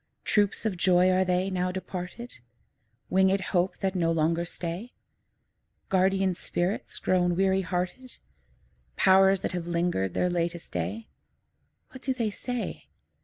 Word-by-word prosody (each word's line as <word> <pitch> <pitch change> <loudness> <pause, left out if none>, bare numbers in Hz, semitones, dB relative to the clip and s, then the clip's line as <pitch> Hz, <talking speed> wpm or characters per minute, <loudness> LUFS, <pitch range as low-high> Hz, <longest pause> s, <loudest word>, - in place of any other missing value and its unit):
Troops 205 +1 +1
of 200 -5 -1
joys 180 +1 +4
are 185 0 +3
they, 185 +1 0
now 180 0 0
departed? 185 - -7 0.7
Winged 190 +1 +4
hopes 180 0 0
that 190 -1 0
no 170 -3 +1
longer 165 +1 +1
stay? 175 +7 -6 1.0
Guardian 190 0 +2
spirits 175 +3 -2
grown 180 -1 +1
weary 190 +1 +2
hearted? 185 +7 -4 0.8
Powers 190 0 +5
that - - -2
have 175 -2 -4
linger'd 170 - 0
their 180 - +2
latest 170 -1 -2
day? 225 +1 -3 0.8
What 260 - -11
do 265 -1 -1
they 230 -4 -1
say? 245 +3 -5
185 Hz, 130 wpm, -27 LUFS, 175-195 Hz, 1.0 s, Powers